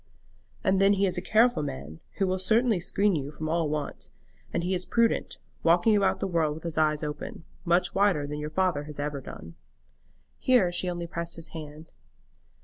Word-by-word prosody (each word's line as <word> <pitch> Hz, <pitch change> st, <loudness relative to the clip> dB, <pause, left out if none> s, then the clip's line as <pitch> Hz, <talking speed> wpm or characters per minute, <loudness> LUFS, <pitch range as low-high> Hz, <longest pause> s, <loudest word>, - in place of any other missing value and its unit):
"And 190 Hz, 0 st, +2 dB
then 195 Hz, +1 st, +6 dB
he 200 Hz, 0 st, +2 dB
is 180 Hz, -2 st, 0 dB
a 180 Hz, -, -1 dB
careful 225 Hz, +1 st, +3 dB
man, 75 Hz, -, -6 dB, 0.2 s
who 195 Hz, -, +1 dB
will 185 Hz, 0 st, -1 dB
certainly 220 Hz, +1 st, +3 dB
screen 200 Hz, +2 st, +1 dB
you 140 Hz, -2 st, -3 dB
from 155 Hz, +1 st, -6 dB
all 165 Hz, -1 st, 0 dB
want; 150 Hz, -1 st, -4 dB, 0.4 s
and 170 Hz, -, -1 dB
he 180 Hz, +2 st, 0 dB
is 180 Hz, -1 st, 0 dB
prudent, 230 Hz, +2 st, +1 dB, 0.2 s
walking 175 Hz, +6 st, +4 dB
about 200 Hz, -1 st, +2 dB
the -, -, -1 dB
world 165 Hz, -5 st, 0 dB
with 160 Hz, -, -10 dB
his 170 Hz, -2 st, -2 dB
eyes 155 Hz, -1 st, +2 dB
open, 150 Hz, +2 st, -6 dB, 0.2 s
much 175 Hz, +1 st, +2 dB
wider 195 Hz, -7 st, +2 dB
than 150 Hz, +1 st, -5 dB
your 150 Hz, 0 st, -4 dB
father 165 Hz, -3 st, 0 dB
has 150 Hz, -1 st, -7 dB
ever 145 Hz, -1 st, -3 dB
done." 85 Hz, -9 st, -10 dB, 0.9 s
Here 240 Hz, -9 st, +4 dB
she 180 Hz, +1 st, -1 dB
only 175 Hz, -1 st, -4 dB
pressed 170 Hz, 0 st, -4 dB
his 165 Hz, -, -6 dB
hand. 155 Hz, 0 st, -10 dB
170 Hz, 195 wpm, -27 LUFS, 150-190 Hz, 0.9 s, then